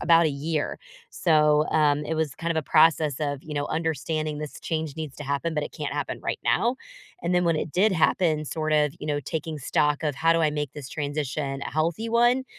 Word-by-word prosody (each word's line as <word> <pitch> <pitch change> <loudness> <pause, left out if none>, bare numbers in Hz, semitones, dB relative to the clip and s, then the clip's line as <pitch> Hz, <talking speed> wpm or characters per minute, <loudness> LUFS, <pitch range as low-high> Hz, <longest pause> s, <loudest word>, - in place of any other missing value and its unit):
about 170 0 +5
a - - +3
year. 150 +2 -2 0.3
So, 150 -1 +3
um, 150 -1 +3
it 160 - -2
was 155 -3 -2
kind 170 0 -1
of - - -5
a 160 - +1
process 155 -2 +4
of, 145 -2 -2
you 150 -1 -7
know, 145 0 -1
understanding 155 -1 -2
this 150 -1 -7
change 160 -3 -3
needs 155 -4 -6
to 145 - -7
happen, 140 +4 -1
but 150 - 0
it - - -9
can't - - -4
happen - - -3
right - - -2
now. 245 +2 +2 0.5
And 180 - +1
then 180 - +3
when 165 -2 +2
it 155 - -3
did 205 +4 +4
happen, 160 -2 +2
sort 155 +1 -2
of, 150 -2 +3
you 150 - -5
know, 145 -1 +1
taking 155 +2 -4
stock 150 +2 +1
of 145 -3 0
how 165 +4 +3
do 165 - +2
I 155 - +3
make 150 -2 -3
this 140 -4 -8
transition 145 -1 -3
a - - -3
healthy 165 +8 0
one? 240 +3 +3
155 Hz, 230 wpm, -25 LUFS, 145-165 Hz, 0.5 s, about